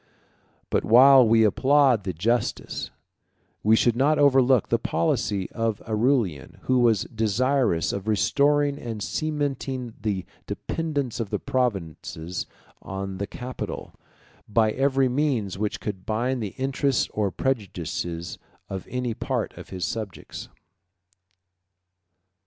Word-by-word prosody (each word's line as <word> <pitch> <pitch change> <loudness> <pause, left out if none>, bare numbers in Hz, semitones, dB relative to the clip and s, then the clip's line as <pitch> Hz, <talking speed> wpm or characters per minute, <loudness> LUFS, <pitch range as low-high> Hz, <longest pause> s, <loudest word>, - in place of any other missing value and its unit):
But - - +2
while 130 +2 +7
we 115 0 +5
applaud 130 0 +3
the 95 - -1
justice, 115 +9 -1 0.7
we 110 +1 +5
should 115 +1 +3
not 145 +5 +3
overlook 135 -4 +4
the - - +2
policy, 95 +4 0
of 115 -2 -1
Aurelian, 110 - 0
who 130 -1 +2
was 115 -3 +3
desirous 115 -3 +1
of 100 +1 -5
restoring 145 +6 +2
and 110 -5 -5
cementing 135 -5 -2
the 100 -4 -2 0.2
dependence 145 -8 -3
of 115 -4 -2
the - - -1
provinces 90 - -3 0.3
on 95 0 -5
the 100 - -2
capital, 125 +4 -6 0.6
by 110 0 +3
every 135 +1 +2
means 125 -8 -1
which 105 -1 -2
could 95 -3 -5
bind 120 +4 -1
the 105 -3 -5
interest 135 0 +1
or 105 -2 0
prejudices 90 - -3 0.3
of 95 -1 -5
any 125 -2 -2
part - - -3
of - - -11
his 90 -1 -3
subjects. 110 -5 -6
115 Hz, 120 wpm, -25 LUFS, 100-130 Hz, 0.7 s, while